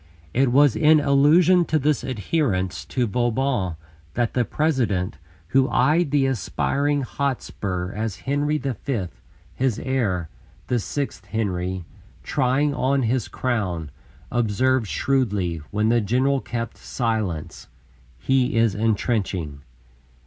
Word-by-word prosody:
It 130 0 +3
was 140 0 +5
in 155 0 +5
allusion 155 +6 +5
to 160 - +1
this 150 -1 +1
adherence 105 - -1
to 125 -2 -1
Vauban 120 -4 0 0.4
that 120 -1 0
the 125 - +2
President, 120 - 0 0.3
who 135 +4 +3
eyed 160 +1 +3
the 140 -1 +2
aspiring 140 +4 0
Hotspur 100 -10 -3
as 110 -3 -4
Henry 145 +2 0
V. 125 -6 -3 0.5
his 130 -4 0
heir, 105 -11 -1 0.4
the 125 - 0
sixth 125 -4 -4
Henry, 95 -4 -2 0.4
trying 140 +2 +1
on 135 0 +1
his 120 +2 0
crown, 90 - -2 0.4
observed 120 +1 +1
shrewdly, 100 - 0
when 105 +1 +1
the 120 0 +3
general 130 +6 +1
kept 115 -1 -5
silence: 110 - -3 0.5
"He 130 - +1
is 115 -3 +3
entrenching." 100 - -1
125 Hz, 115 wpm, -23 LUFS, 100-140 Hz, 0.5 s, was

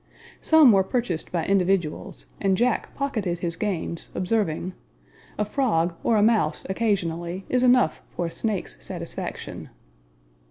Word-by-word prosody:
Some 315 -6 +7
were 195 -2 +4
purchased 190 -6 -2
by 170 -2 -1
individuals, 190 -4 0 0.2
and 195 -2 +2
Jack 245 +2 +1
pocketed 215 -11 -2
his 170 -1 -3
gains, 170 -3 -2
observing, 185 -3 -1 0.6
"A 210 - +1
frog, 195 -8 +1
or 225 - +3
a 205 - +4
mouse, 215 -8 +2
occasionally, 185 -3 -1
is 250 - +2
enough 250 -10 +4
for 175 - -1
a 165 - -4
snake's 195 - -3
satisfaction." - - -6
195 Hz, 130 wpm, -25 LUFS, 170-225 Hz, 0.6 s, Some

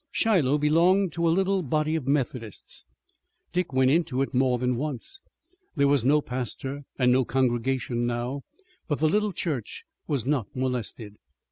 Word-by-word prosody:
Shiloh 160 -11 +2
belonged 170 +5 +3
to 170 0 0
a - - +4
little 190 +3 +2
body 155 +1 0
of 145 -5 -3
Methodists. 125 -6 -3 0.7
Dick 180 -4 -1
went 130 0 +3
into 145 -5 +1
it - - -5
more 130 -1 +2
than 125 0 0
once. 145 - -5 0.5
There 140 -2 +3
was 140 -4 +3
no 150 +4 +4
pastor 130 +2 -4 0.2
and 125 -2 +3
no 130 +1 +4
congregation 120 -1 0
now, 120 +3 -3 0.5
but 145 - 0
the 155 - +2
little 210 +5 +1
church 155 - -4 0.2
was 135 -6 -1
not 135 -6 0
molested. 120 -4 -3
135 Hz, 155 wpm, -26 LUFS, 125-155 Hz, 0.7 s, a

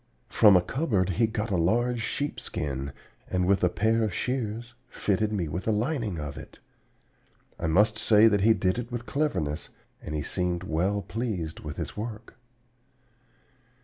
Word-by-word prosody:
From 105 -4 +7
a 90 - +2
cupboard 105 - 0
he 110 +5 +2
got 110 -1 -3
a 95 - +2
large 120 +8 +1
sheepskin, 70 - -3 0.4
and 90 -1 +1
with 95 +1 +2
a 90 - +5
pair 110 +5 +1
of 105 -5 -1
shears 120 -2 -3 0.2
fitted 105 -1 0
me 95 -6 -1
with 90 +7 -4
a - - +4
lining 110 - -1
of 75 -2 -5
it. - - -12 1.0
I - - -1
must 105 +6 +3
say 110 0 +6
that 105 -3 +3
he 110 +2 +5
did 95 +5 0
it 120 0 -6
with 120 0 -4
cleverness, 90 - -1 0.3
and 75 - -5
he 75 - -2
seemed 90 -1 -2
well 95 +4 0
pleased 95 -7 -3
with 75 -2 -7
his - - -5
work. 110 +1 -6
105 Hz, 165 wpm, -27 LUFS, 90-115 Hz, 1.0 s, From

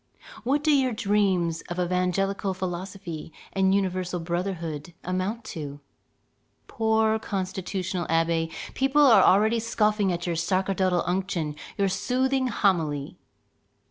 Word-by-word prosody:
what 280 +4 +1
do 305 -1 +4
your 260 -2 +2
dreams 195 -6 +1
of 175 +1 -4
evangelical 185 +2 0
philosophy 185 -2 -5 0.2
and 190 0 +3
universal 185 -2 -1
brotherhood 170 -2 -4
amount 185 +6 -2
to? 145 -8 -7 0.9
Poor 220 0 +1
constitutional 190 -2 -3
abbé, 165 0 +1 0.2
people 270 +2 +3
are 215 -4 +6
scoffing 215 -2 +1
already 185 - +1
at 175 - -6
your 170 -1 -1
sacerdotal 185 +1 +1
unction, 180 -4 -1 0.2
your 200 - +2
soothing 260 +6 0
homily! 160 - 0
190 Hz, 110 wpm, -26 LUFS, 175-210 Hz, 0.9 s, are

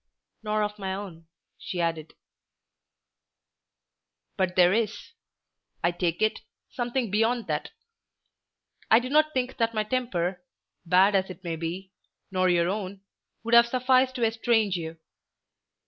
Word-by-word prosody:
"Nor 215 0 0
of 210 0 -4
my 190 -1 -3
own," 175 -5 -9 0.3
she 180 - -5
added. 165 -2 -2 2.2
"But 185 -2 -1
there 180 0 +5
is, 225 0 0 0.9
I 170 - +3
take 175 +2 -1
it, 215 - +1 0.3
something 240 -3 -2
beyond 225 +3 +1
that. - - -3 1.2
I 220 - +7
do 250 +2 -1
not 310 +1 +4
think 255 -2 -2
that 230 -1 0
my 215 - +1
temper, 195 -7 -2 0.4
bad 185 +4 +5
as 190 -1 +1
it 185 +1 -10
may 170 -2 -3
be, 175 +4 -5 0.4
nor 185 -1 +2
your 170 -1 +3
own, 195 0 -4 0.4
would 230 +1 -3
have 235 0 +8
sufficed 255 +1 +2
to 240 -3 +1
estrange 225 -3 +1
you. 165 -1 -5
205 Hz, 135 wpm, -26 LUFS, 180-235 Hz, 2.2 s, have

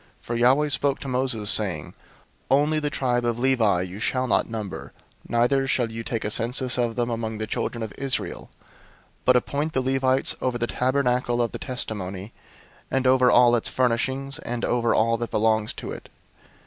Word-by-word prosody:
001:048 - - -34
For 120 - -3
Yahweh 130 +5 +3
spoke 140 -1 +1
to 140 - -6
Moses, 125 -5 +1
saying, 90 -9 +1
001:049 - - -14 0.6
"Only 150 +3 +3
the 150 -1 -2
tribe 125 -4 0
of 120 -1 0
Levi 120 -8 +2
you 95 +2 -8
shall 130 +4 0
not 125 - +1
number, 105 -4 -6 0.4
neither 125 +3 +2
shall 120 -3 0
you 115 0 -6
take 115 -1 -3
a 105 - 0
census 125 +3 +2
of 120 -2 0
them 120 -1 -1
among 110 -1 -3
the 110 - -3
children 115 +1 -3
of 110 - -6
Israel; 135 -1 -3
001:050 - - -29 0.6
but 125 - +5
appoint 145 +5 -1
the 130 - +1
Levites 130 0 +1
over 125 -1 -1
the 120 - -1
Tabernacle 125 -1 0
of 120 -1 0
the - - -6
Testimony, 100 -6 -5 0.6
and 135 0 0
over 130 -1 +5
all 120 -1 +5
its 115 - 0
furnishings, 130 +2 -1
and 120 0 -3
over 120 -1 +1
all 115 +1 +2
that 120 0 -4
belongs 110 0 +1
to - - -7
it. - - -9
120 Hz, 190 wpm, -24 LUFS, 115-130 Hz, 0.6 s, but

